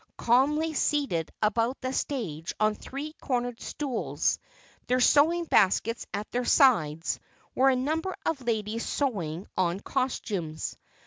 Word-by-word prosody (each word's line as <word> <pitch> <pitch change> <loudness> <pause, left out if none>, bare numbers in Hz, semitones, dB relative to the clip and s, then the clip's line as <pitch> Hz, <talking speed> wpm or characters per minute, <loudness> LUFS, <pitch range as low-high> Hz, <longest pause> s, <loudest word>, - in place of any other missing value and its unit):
Calmly 295 +7 +2
seated 275 - 0
about 230 +4 +1
the 260 0 -3
stage 175 - -3
on 215 0 +3
three 280 +7 -7
cornered 245 -3 -2
stools, 275 -6 -1 0.5
their 255 +1 +2
sewing 320 +7 +4
baskets 230 - +2
at 205 +1 -4
their 245 +1 0
sides, 170 - +3 0.3
were 270 +1 +4
a 265 - +3
number 315 +8 -1
of 310 -5 -1
ladies 225 -1 -1
sewing 190 - -2
on 180 +1 +1
costumes. 200 - -2
245 Hz, 125 wpm, -28 LUFS, 205-275 Hz, 0.5 s, sewing